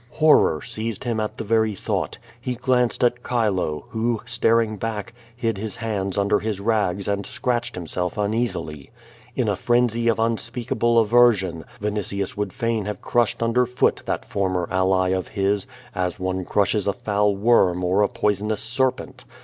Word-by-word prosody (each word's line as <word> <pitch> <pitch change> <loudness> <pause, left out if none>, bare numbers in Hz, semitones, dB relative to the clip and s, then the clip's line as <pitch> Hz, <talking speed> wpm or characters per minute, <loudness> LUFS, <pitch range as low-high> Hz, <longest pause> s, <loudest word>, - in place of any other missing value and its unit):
Horror 150 - +4
seized 110 -1 -4
him 120 -3 -1
at 105 0 -3
the - - -4
very 110 -1 +1
thought. - - -2 0.2
He 125 0 -3
glanced 125 0 +1
at 120 0 +2
Chilo, 95 - 0
who, 115 0 -1
staring 115 -2 +2
back, 110 0 -4 0.2
hid 115 -4 -2
his 110 0 -4
hands 100 -4 -3
under 100 +1 +2
his 105 -3 -3
rags 100 -3 0
and 100 0 -1
scratched 120 +1 -2
himself 90 +2 -3
uneasily. 105 - -2 0.5
In - - 0
a - - +1
frenzy 120 -1 +1
of 115 - +3
unspeakable 115 0 +1
aver 120 +2 +6
sion, 90 -5 -5
Vinitius 100 -2 -3
would 105 -2 -2
fain 115 0 -1
have 105 0 -5
crushed 120 -1 +1
under 120 +2 +2
foot 125 +1 +1
that - - -2
former 95 -3 -1
ally 95 0 +2
of 95 -1 -1
his, 100 +3 0 0.3
as 90 +2 -2
one 95 0 -2
crushes 105 +1 +1
a 100 - +2
foul 105 -4 +1
worm 95 -4 +3
or 95 +3 +2
a 105 - +4
poisonous 105 +1 0
serpent. 130 +3 -1
105 Hz, 165 wpm, -23 LUFS, 95-115 Hz, 0.5 s, aver